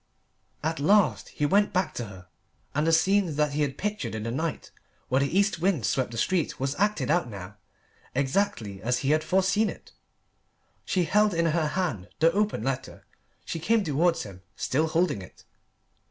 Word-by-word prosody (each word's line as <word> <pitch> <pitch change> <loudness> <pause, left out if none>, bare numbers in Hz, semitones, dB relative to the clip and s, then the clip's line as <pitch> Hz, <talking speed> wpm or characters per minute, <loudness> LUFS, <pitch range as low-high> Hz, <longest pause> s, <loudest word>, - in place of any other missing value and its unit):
At 160 0 -1
last 200 +7 +3
he 150 - -2
went 200 +7 +3
back 185 +1 0
to 120 - -4
her. 95 -3 -12 0.5
And 150 +2 +1
the - - +4
scene 185 0 +3
that 150 0 +1
he 150 - 0
had 140 -2 -1
pictured 210 - -3
in 110 - -4
the 115 - -3
night 160 +4 -3 0.4
where 130 +2 +3
the 140 +6 0
east 200 -4 +2
wind 170 - +1
swept 130 +4 0
the 115 - -7
street 170 +6 0
was 135 +1 -1
acted 210 -5 +1
out 170 -6 +1
now, 100 -1 -9 0.6
exactly 130 - -1
as 120 +2 +1
he 140 - +3
had 155 0 +2
foreseen 190 +5 +2
it. - - -10 0.9
She 185 - +1
held 205 +3 +3
in 170 0 +2
her 160 -1 +1
hand 150 - -2
the 165 +3 +4
open 205 - 0
letter. 135 0 -4 0.4
She 165 - -4
came 220 +6 +2
towards 165 +1 +1
him, 95 -3 -11
still 155 +5 0
holding 160 - +1
it. 90 - -14
155 Hz, 185 wpm, -27 LUFS, 130-185 Hz, 0.9 s, the